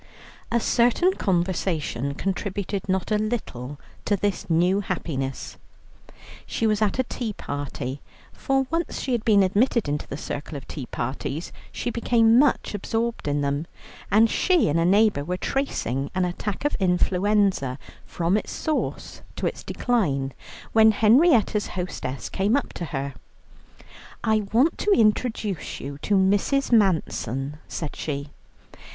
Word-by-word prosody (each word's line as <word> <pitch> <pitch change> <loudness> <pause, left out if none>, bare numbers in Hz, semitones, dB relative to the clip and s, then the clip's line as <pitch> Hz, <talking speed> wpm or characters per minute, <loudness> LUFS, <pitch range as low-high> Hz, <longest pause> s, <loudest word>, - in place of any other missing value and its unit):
A 235 - +3
certain 245 +11 +3
conversation 170 - -1
contributed 195 +1 -3
not 190 +2 0
a 210 - +3
little 145 - -4 0.3
to 205 - +2
this 200 -2 -2
new 175 +4 +3
happiness. 135 -8 -4 0.9
She 225 - -1
was 215 -1 +2
at 215 +1 +2
a 260 - +2
tea 235 -3 -4
party, 140 -4 -5 0.3
for 270 0 0
once 330 -1 -1
she 265 - -3
had 235 -3 0
been 205 -3 +5
admitted 210 - +2
into 145 0 -2
the 140 - -5
circle 150 0 -5
of 135 - -10
tea 135 -5 -6
parties, 135 +5 -4 0.2
she 240 - -3
became 230 0 +4
much 285 -5 +2
absorbed 225 0 -2
in 145 0 0
them, 140 +3 -1 0.4
and 215 +4 +5
she 355 - +2
and 155 +3 +2
a 165 - +2
neighbour 200 -4 +4
were 180 +4 -3
tracing 140 - -2
an 185 -1 +2
attack 195 +7 -4
of 290 - +2
influenza 185 -5 +2 0.3
from 175 +4 0
its - - -4
source 310 -2 -3
to - - -3
its - - -2
decline, 140 - 0 0.4
when 220 -1 +6
Henrietta's 225 - +4
hostess 160 -7 -4
came 205 +7 +1
up 280 - -4
to 175 - -4
her. 140 -2 -4 1.1
"I 215 -2 +1
want 255 +9 +3
to - - 0
introduce 215 - +1
you 140 +1 -7
to 205 +7 0
Mrs. 205 +9 +2
Manson," 150 - +1
said 155 -3 -5
she. 140 -1 -4
195 Hz, 145 wpm, -24 LUFS, 150-225 Hz, 1.1 s, when